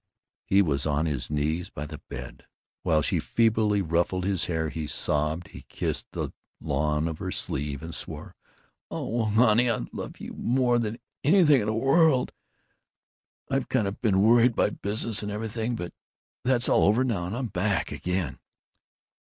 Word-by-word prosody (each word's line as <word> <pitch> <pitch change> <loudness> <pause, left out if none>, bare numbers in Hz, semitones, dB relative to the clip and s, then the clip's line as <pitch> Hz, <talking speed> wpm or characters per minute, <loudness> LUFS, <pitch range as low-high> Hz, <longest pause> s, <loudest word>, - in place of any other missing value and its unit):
He 100 +1 +5
was 75 -3 0
on 75 +1 +1
his 70 -6 -2
knees 75 +3 -1
by 75 - -6
the 75 0 -8
bed. - - -8 0.3
While 75 -1 +2
she - - +1
feebly 110 -3 +2
ruffled 85 +2 0
his 95 -3 0
hair, 80 -2 -1
he 75 0 -4
sobbed, 75 +3 -1
he - - -11
kissed - - -3
the - - -3 0.3
lawn 75 +2 0
of 80 -1 -5
her - - -3
sleeve, 70 0 -2
and 85 0 -6
swore, - - -5 0.5
"Old 110 -1 -2
honey, 120 +1 +4
I 115 - 0
love - - -7
you - - -7
more 120 0 +1
than 115 0 -2 0.3
anything 150 -3 +5
in 105 - -3
the 110 - 0
world! 135 +2 +3 1.2
I've 135 -2 -1
kind 115 -6 +1
of 95 - -6
been 100 -4 +3
worried 120 +1 +5
by - - +2
business 110 +2 +1
and 105 0 -4
everything, 110 +2 -3
but 90 -5 -6 0.5
that's 125 -1 +2
all - - +4
over 110 +6 +4
now, 100 -9 -1
and 100 +6 -4
I'm 130 - -2
back 100 +2 -1
again." 90 -6 -2
100 Hz, 165 wpm, -27 LUFS, 80-115 Hz, 1.2 s, He